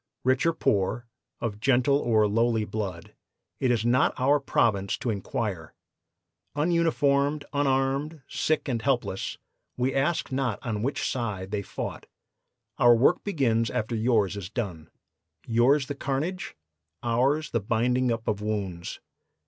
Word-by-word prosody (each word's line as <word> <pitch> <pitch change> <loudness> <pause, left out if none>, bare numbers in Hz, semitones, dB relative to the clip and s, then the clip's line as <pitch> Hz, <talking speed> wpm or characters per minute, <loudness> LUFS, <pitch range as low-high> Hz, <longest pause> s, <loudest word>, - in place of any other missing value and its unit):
Rich 130 +5 +2
or 165 - +3
poor, 105 -1 0 0.3
of 105 -3 -3
gentle 130 +3 +3
or 110 -5 +3
lowly 115 +1 +1
blood, 95 -6 -5 0.5
it 130 - +1
is 115 -2 +1
not 125 +2 +2
our 140 +3 +4
province 105 -7 +1
to 120 - -2
inquire. 100 -4 -4 0.8
Ununiformed, 150 -3 +2
unarmed, 140 +2 0
sick 155 -1 0
and 120 -4 -1
helpless, 120 -7 -1 0.4
we 125 +1 0
ask 145 +3 0
not 130 -5 0
on 110 -3 -2
which 135 +6 -1
side 105 -7 -3
they 105 -1 -1
fought. - - -6 0.7
Our 120 0 +7
work 120 +4 +3
begins 120 - +1
after 110 +2 -2
yours 110 -4 +2
is 95 -3 -6
done. 90 -9 -5 0.6
Yours 125 +5 +3
the 145 - -4
carnage, 150 +7 -3 0.5
ours 135 +6 +1
the 115 - +1
binding 120 +4 +1
up 115 0 -3
of 105 -1 -1
wounds. 100 -5 -3
120 Hz, 135 wpm, -27 LUFS, 110-140 Hz, 0.8 s, Our